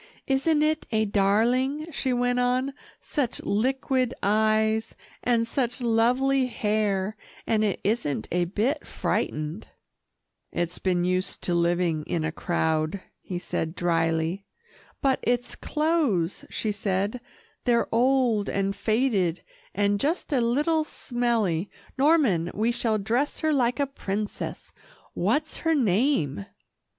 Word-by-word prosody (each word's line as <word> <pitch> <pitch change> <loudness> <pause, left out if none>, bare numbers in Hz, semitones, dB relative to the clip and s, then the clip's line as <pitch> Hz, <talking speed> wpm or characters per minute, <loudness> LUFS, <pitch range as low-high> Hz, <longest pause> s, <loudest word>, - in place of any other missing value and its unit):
Isn't 295 +3 +2
it 310 0 0
a 220 -1 +2
darling," 235 +9 +2
she 270 -3 -1
went 245 0 +1
on, 255 +2 +1 0.3
"such 275 -6 -1
liquid 255 +3 0
eyes, 220 +1 +2 0.3
and 235 -2 +2
such 245 +1 -1
lovely 250 +3 +2
hair, 210 -3 0 0.3
and 215 -1 +2
it 205 -3 0
isn't 195 - -1
a 175 0 +2
bit 215 - -1
frightened." 155 +6 -2 0.8
"It's 175 0 -2
been 180 -2 +1
used 185 +2 -1
to 175 - 0
living 170 -2 +1
in 165 -2 -1
a 160 - -1
crowd," 160 +1 0 0.2
he 180 - -5
said 165 -1 -3
dryly. 165 +2 0 0.6
"But 270 -1 +3
its 245 0 0
clothes," 300 - 0
she 215 - -2
said, 205 +3 -1 0.4
"they're 235 -1 +3
old, 240 -3 +3
and 195 0 -1
faded, 205 -5 +1 0.3
and 205 0 +2
just 310 - -1
a 255 - +3
little 295 +7 +2
smelly. 230 - -1 0.3
Norman, 265 - +3
we 225 +3 +1
shall 225 -2 +1
dress 235 +8 -1
her 315 -1 +2
like 250 -1 +1
a 285 - +3
princess 210 -6 -4 0.4
what's 310 +1 0
her 325 -1 +1
name?" 205 - +1
220 Hz, 125 wpm, -26 LUFS, 190-260 Hz, 0.8 s, But